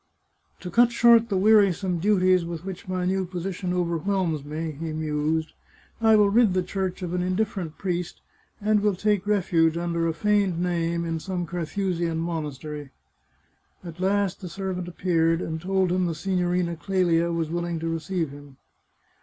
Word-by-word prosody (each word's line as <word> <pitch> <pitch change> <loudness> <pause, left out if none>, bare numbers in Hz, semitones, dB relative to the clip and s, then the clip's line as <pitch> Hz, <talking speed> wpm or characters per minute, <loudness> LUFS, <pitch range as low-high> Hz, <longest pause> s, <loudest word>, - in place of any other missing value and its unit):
" - - -43
To 180 - -6
cut 240 +4 +5
short 235 -1 +5
the 195 - +1
wearisome 195 -3 +3
duties 185 -1 +3
with 170 +1 -6
which 190 -2 -7
my 185 -1 -2
new 190 +1 +1
position 180 0 -4
overwhelms 175 -2 -1
me," 155 +2 -4
he 155 +2 -5
mused, 155 +1 -1 0.3
" - - -31
I 220 -1 +6
will 205 -1 +4
rid 220 -3 +4
the 185 - +2
Church 190 -1 -3
of 175 -1 -3
an 180 - 0
indifferent 185 -3 -2
priest, 180 -2 -3 0.4
and 210 0 +2
will 205 -1 +1
take 205 0 0
refuge, 170 -5 +2
under 170 -1 -1
a 165 - 0
feigned 200 -2 +1
name, 170 -1 -1
in 165 -1 -2
some 180 +1 -3
Carthusian 175 0 -2
monastery." 150 -3 -4 0.9
At 170 -1 -9
last 195 0 0
the 180 - -6
servant 185 -1 -4
appeared, 165 -2 +1
and 160 -2 -4
told 190 0 +1
him 180 0 +1
the 165 - -2
Signorina 180 -1 -1
Clelia 170 -2 +1
was 165 -2 -2
willing 170 0 -2
to 165 +1 -4
receive 165 -1 -2
him. 145 -1 -13
180 Hz, 170 wpm, -25 LUFS, 165-190 Hz, 0.9 s, I